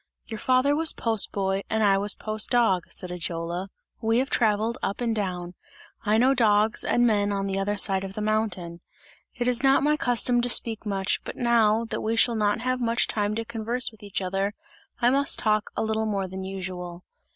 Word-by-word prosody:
"Your 220 - -5
father 255 +4 +2
was 320 +1 +2
post 225 -3 0
boy 195 -1 -1
and 220 0 +1
I 195 -1 +4
was 205 +1 +1
post 215 0 -1
dog," 225 -8 +2
said 180 -2 -3
Ajola. 175 +1 -4 0.3
"We 225 +1 +1
have 265 +2 0
travelled 220 +1 +1
up 200 - -3
and 235 -2 -1
down; 180 -4 -3 0.5
I 215 0 +2
know 255 +4 +4
dogs 220 -2 +2
and 240 - +2
men 205 -3 +2
on 195 -1 -1
the 195 0 -2
other 205 +1 -1
side 195 -1 +3
of 195 0 -7
the - - -4
mountain. 205 -6 -2 0.5
It 240 -1 -2
is 250 -1 +2
not 270 +1 +4
my 300 +1 +3
custom 245 -1 +2
to 245 - -1
speak 225 -2 0
much, 195 -1 -1
but - - -7
now, 230 -2 +2
that 225 - -4
we 225 +1 -1
shall 235 +1 +3
not 210 0 0
have 255 0 -1
much 235 0 +1
time 210 0 -1
to 230 +1 -3
converse 235 +2 -2
with 220 -1 -20
each 200 -2 -4
other, 195 +3 -2 0.4
I 240 0 +3
must 280 +1 +2
talk 215 -2 0
a - - 0
little 220 0 -1
more 200 -3 -1
than 190 +1 -7
usual. 185 -2 -6
215 Hz, 205 wpm, -25 LUFS, 195-235 Hz, 0.5 s, I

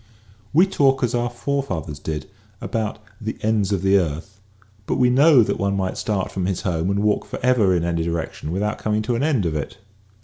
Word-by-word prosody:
We 170 +6 +5
talk 135 -8 +2
as 125 - +1
our 120 0 0
forefathers 120 - -3
did 75 -1 -4 0.3
about 110 -1 -3
" - - -29
the 110 0 -4
ends 105 -2 +1
of 95 -2 0
the 100 +1 +5
earth 85 +4 -4 0.2
" 100 0 -32
but - - 0
we 125 -1 +3
know 140 -1 +6
that - - -2
one 100 0 0
might 95 -1 -1
start 100 -3 -2
from 95 -1 -2
his 95 -2 -1
home 85 -1 -1
and 100 +1 0
walk 105 -1 +2
forever 115 -7 +2
in 85 - 0
any' 85 -1 0
direction 80 -2 -3
without 105 +4 -1
coming 110 0 0
to 120 +2 -1
an 115 - -1
end 140 - +1
of 80 -2 -1
it. 75 - -4
100 Hz, 215 wpm, -22 LUFS, 90-120 Hz, 0.3 s, know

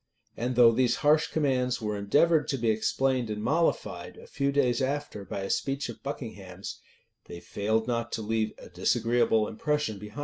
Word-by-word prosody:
[] - - -52
And 125 +2 -2
though 120 -1 +7
these 125 +1 +2
harsh 155 +1 +5
commands 130 -5 0
were 105 -2 -2
endeavored 150 +11 +3
to 135 - -1
be 115 -2 +2
explained 125 +2 0
and 105 0 -4
mollified, 160 +8 -1
a - - -12
few 140 0 -1
days 130 -4 +2
after, 140 -5 -2
by 100 - -5
a 95 - -4
speech 135 0 -1
of - - -9
Buckingham's,[] 100 -9 -7 0.5
they 85 - -9
failed 110 +4 -1
not 115 -1 -1
to 110 - -2
leave 110 0 -1
a - - -12
disagreeable 115 +3 +2
impression 150 -2 -1
behind 105 0 -10
them. 130 - -7
120 Hz, 190 wpm, -28 LUFS, 110-135 Hz, 0.5 s, though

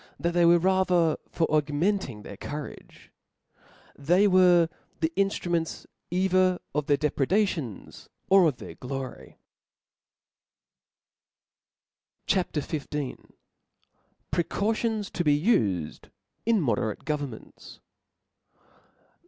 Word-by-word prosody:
tbac 170 - 0
they 175 0 +4
were 170 +1 +7
rather 180 -3 +2
for 165 - 0
augmenting 150 - 0
their 100 - -9
courage; 145 +7 -9 0.8
they 175 +8 +3
were 180 -3 +5 0.3
the 160 0 0
inftruments 175 -4 -1 0.2
either 185 0 +2 0.2
Qt 150 0 -1
their 145 - +3
depred^ 145 -2 0
^ 210 +2 +3
tions 135 - -7 0.2
or 190 -2 +6
of 140 -5 -1
their - - -9
glpry, 130 -1 -7 2.9
CHAP, 180 -4 0
XV. 150 -2 -3 1.2
Precautions 210 +4 -1
to 175 - -2
be 145 -2 +3
ufed 100 - 0 0.4
in 230 -2 +4
Moderate 110 - -1
Governments. 145 -6 -6
165 Hz, 95 wpm, -27 LUFS, 145-185 Hz, 2.9 s, were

